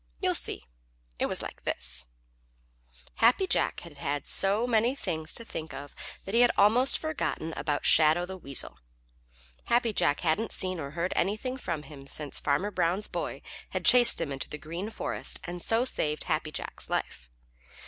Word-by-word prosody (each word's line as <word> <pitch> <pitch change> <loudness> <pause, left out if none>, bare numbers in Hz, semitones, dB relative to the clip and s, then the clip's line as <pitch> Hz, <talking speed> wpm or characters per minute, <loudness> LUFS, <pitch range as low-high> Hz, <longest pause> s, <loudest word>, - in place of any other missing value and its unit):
You - - +1
see, 65 - -2 0.5
it - - +1
was - - 0
like - - -8
this: 60 0 -4 1.1
Happy 245 +12 +4
Jack - - +1
had 165 -4 -12
had 145 0 -2
so 200 +4 +3
many 240 +2 +2
things 160 - -2
to 230 - -5
think 160 -7 -6
of 145 0 -8 0.3
that 195 - -6
he 230 - +4
had 245 - +6
almost 230 +6 +6
forgotten 295 - -3
about 145 -2 -2
Shadow 160 +2 +5
the 190 +1 -7
Weasel. 140 -7 -1 0.9
Happy 235 -2 +2
Jack 145 - +2
hadn't 180 +7 +1
seen 185 -2 -1
or 140 - -4
heard 180 +2 0
anything 215 +7 -1
of 160 -3 -2
him 140 -1 -12
since 145 0 -4
Farmer 190 +9 0
Brown's 180 +2 0
boy - - -4 0.3
had - - -4
chased 250 -1 +7
him 165 -4 -2
into 135 0 -4
the 150 - -5
Green 170 +7 -5
Forest - - -2
and 175 0 -5
so 225 +6 +1
saved 150 -11 0
Happy - - -1
Jack's - - -5
life. - - -3
175 Hz, 170 wpm, -29 LUFS, 150-225 Hz, 1.1 s, chased